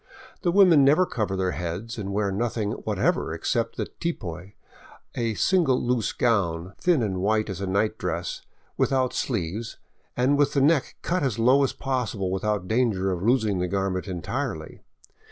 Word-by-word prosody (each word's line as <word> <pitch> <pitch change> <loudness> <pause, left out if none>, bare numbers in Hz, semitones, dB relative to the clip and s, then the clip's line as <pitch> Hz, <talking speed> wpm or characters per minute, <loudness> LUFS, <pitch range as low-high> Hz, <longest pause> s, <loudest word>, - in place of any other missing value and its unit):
The 175 - +1
women 180 -6 +6
never 150 +7 +5
cover 105 - -2
their 95 -1 0
heads 90 +7 -5
and 100 -1 -4
wear 100 0 0
nothing 110 0 -1
whatever - - -1
except - - -1
the - - -2
tipoy, 95 - -5 0.6
a 115 -2 -1
single 170 - +2
loose 120 -3 0
gown, 95 -6 0
thin 170 -8 +2
and 95 -4 -2
white 110 +1 +1
as 95 0 -6
a 100 - -2
night 100 +3 0
dress, - - -3 0.4
without 130 -2 +1
sleeves 110 -1 -3 0.4
and 135 +3 +2
with 145 0 +3
the 140 - +2
neck 145 0 +2
cut 180 +1 0
as 130 -6 0
low 130 +5 +4
as 135 - +2
is - - -8
possible 115 -8 -2
without 95 0 -1
danger 110 -5 +1
of 90 -2 -3
losing 110 -3 +2
the 90 - 0
garment 95 0 -2
entirely. 90 -4 -4
110 Hz, 170 wpm, -25 LUFS, 95-130 Hz, 0.6 s, women